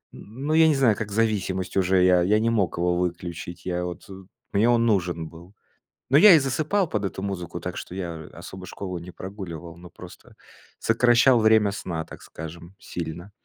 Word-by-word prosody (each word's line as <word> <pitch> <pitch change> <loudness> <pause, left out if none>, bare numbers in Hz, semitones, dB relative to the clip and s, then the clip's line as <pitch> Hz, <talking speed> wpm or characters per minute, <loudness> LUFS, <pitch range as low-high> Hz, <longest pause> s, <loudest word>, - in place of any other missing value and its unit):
ну, 135 +9 -5
я 160 0 +6
не 155 - +3
знаю, 125 -6 +3
как 105 0 -5
зависимость 100 -4 -1
уже, 95 0 +3
я 90 -1 +5
я 105 +4 +3
не 115 +1 +1
мог 100 -7 0
его 90 0 +1
выключить, 85 -1 -4
я 90 -1 -2
вот 90 - -7 0.4
мне 110 +4 +3
он 115 -1 +3
нужен 85 -6 0
был. 85 +5 -14 0.6
Ну, 140 - +7
я 200 +2 +9
и - - +6
засыпал 155 +8 0
под 105 -2 -2
эту 95 - -5
музыку, 95 -3 -4
так - - -6
что - - -7
я 85 -4 -5
особо 95 0 -10
школу 90 -3 -6
не 85 +2 -10
прогуливал, 85 -4 -8
но 90 0 -12
просто - - -14 0.5
сокращал 120 +2 +4
время 110 -2 +4
сна, 85 -5 -4
так - - -12
скажем, 85 +4 -10
сильно. 85 +3 -7
95 Hz, 185 wpm, -24 LUFS, 85-115 Hz, 0.6 s, я